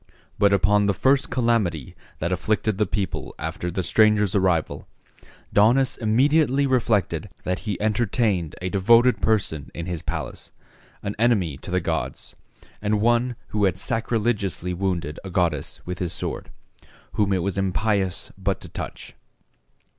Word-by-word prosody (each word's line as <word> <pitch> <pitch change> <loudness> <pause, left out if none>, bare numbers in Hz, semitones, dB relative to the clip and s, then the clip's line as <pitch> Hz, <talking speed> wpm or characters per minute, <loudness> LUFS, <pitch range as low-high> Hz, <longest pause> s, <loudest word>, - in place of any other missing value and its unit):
But 100 -1 +5
upon 100 +2 +3
the 100 - +1
first 135 +1 +2
calamity 110 - 0 0.2
that 85 +3 -2
afflicted 110 +2 0
the 105 - +2
people 100 0 -3
after 90 - -4
the 90 +2 -2
stranger's 105 -1 +3
arrival, 95 -5 0 0.7
Daunus 125 +6 +4
immediately 135 +5 +3
reflected 105 - +1
that 90 0 -1
he 100 - -2
entertained 105 -5 0
a 90 - -2
devoted 115 +5 +4
person 90 -10 0
in 85 - -4
his 90 -3 -4
palace, - - -5 0.5
an 100 - -3
enemy 105 - +2
to - - -11
the 90 0 +1
gods, 85 - -3 0.5
and 105 0 +1
one 120 +2 +2
who 105 -1 +1
had 95 -2 +1
sacrilegiously 105 -4 -1
wounded 85 -5 -2
a 95 - -6
goddess 85 -5 -1
with 90 0 -5
his 90 -3 -2
sword, - - -5 0.6
whom 100 -2 +1
it 95 -3 +1
was 100 -1 -1
impious 95 0 0
but 95 +1 -1
to - - -8
touch. - - -7
100 Hz, 145 wpm, -24 LUFS, 90-115 Hz, 0.7 s, But